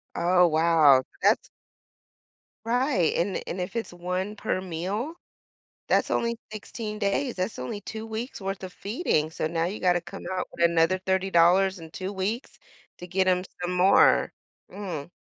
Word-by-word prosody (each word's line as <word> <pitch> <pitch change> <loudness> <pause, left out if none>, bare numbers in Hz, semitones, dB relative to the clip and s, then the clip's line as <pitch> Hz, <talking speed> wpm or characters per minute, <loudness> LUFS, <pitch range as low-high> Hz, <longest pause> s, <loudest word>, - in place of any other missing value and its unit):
Oh, 180 +1 +4
wow. 155 -5 +5 0.2
That's - - +3 1.2
Right. 245 - +2
And 185 +3 0
and 185 - -4
if 180 +5 -4
it's 230 - -3
1 180 +3 -3
per 185 -2 -2
meal, 190 - -3 0.7
that's - - +2
only 235 0 0
16 215 0 -6
days. 220 +5 0
That's 185 - -3
only 165 +12 -4
2 220 +1 -7
weeks' 225 +1 -5
worth 195 0 -4
of 185 - -7
feeding. 200 - -1
So 155 - -3
now 165 0 0
you 195 +4 -4
gotta 180 -1 +2
come 175 +1 -10
out 185 - -2
with 170 - -1
another 170 +2 +2
$30 190 +1 0 0.5
in 160 -1 -10
2 190 +2 -5
weeks 205 +6 -3 0.4
to 180 - -8
get 185 +1 +1
'em 180 0 +2 0.2
some 180 +1 -1
more. 190 +2 +5 0.4
Mm. 175 -7 -5
185 Hz, 160 wpm, -26 LUFS, 175-210 Hz, 1.2 s, wow